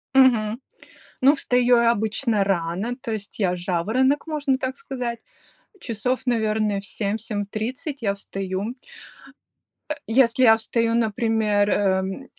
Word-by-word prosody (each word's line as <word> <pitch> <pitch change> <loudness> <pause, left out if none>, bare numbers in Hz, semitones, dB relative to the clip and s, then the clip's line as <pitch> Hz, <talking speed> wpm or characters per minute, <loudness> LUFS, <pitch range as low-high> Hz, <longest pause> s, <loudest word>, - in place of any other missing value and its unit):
Мгм. 235 -4 +4 0.6
Ну 275 +2 +6
встаю 250 -4 +3
я 235 0 +4
обычно 220 -1 0
рано, 195 +5 -1
то 245 -5 -5
есть 215 0 -6
я 180 -3 +1
жаворонок, 220 - 0
можно 290 -4 0
так 260 0 -3
сказать. 250 - -5 0.6
Часов, 250 +3 -2
наверное, 215 -4 0
в 200 - -9
7-7:30 215 +7 -4
я 200 -3 0
встаю. 195 +3 -5 1.1
Э, 300 - 0
если 245 +1 +3
я 225 -2 +8
встаю, 230 +1 -1
например, 220 -2 +1
эм, 190 +4 0
225 Hz, 120 wpm, -23 LUFS, 205-250 Hz, 1.1 s, я